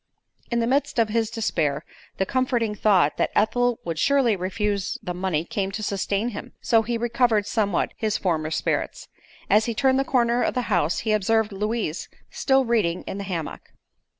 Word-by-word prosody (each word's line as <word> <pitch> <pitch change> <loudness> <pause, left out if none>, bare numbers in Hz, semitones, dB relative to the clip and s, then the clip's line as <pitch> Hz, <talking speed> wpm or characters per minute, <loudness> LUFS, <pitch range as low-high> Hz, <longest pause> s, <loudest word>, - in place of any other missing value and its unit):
In 235 -1 0
the - - +1
midst 270 +3 0
of 225 -2 +3
his 225 0 0
despair 160 -11 -1 0.3
the 190 - +1
comforting 245 -2 0
thought 190 -8 +3
that - - +1
Ethel 245 +2 +2
would 165 -2 -3
surely 270 - +3
refuse 195 +1 -2
the 180 -3 -3
money 175 -3 -1
came 195 -2 -2
to 215 - -4
sustain 200 +2 -1
him; 210 - -8
so 225 -2 +3
he 230 +1 -2
recovered 235 -2 +1
somewhat 205 -1 0
his 215 -2 0
former 160 -4 -1
spirits. 160 - -2 0.4
As 210 +3 +4
he 235 - -2
turned 265 +2 +3
the - - +2
corner 240 -2 +2
of - - 0
the 250 - 0
house 170 -2 +1
he 220 - -1
observed 215 +1 +2
Louise 210 -4 -3 0.2
still 265 -1 +2
reading 210 -8 0
in 195 - -6
the - - -4
hammock. 170 -5 -5
215 Hz, 180 wpm, -24 LUFS, 190-235 Hz, 0.4 s, As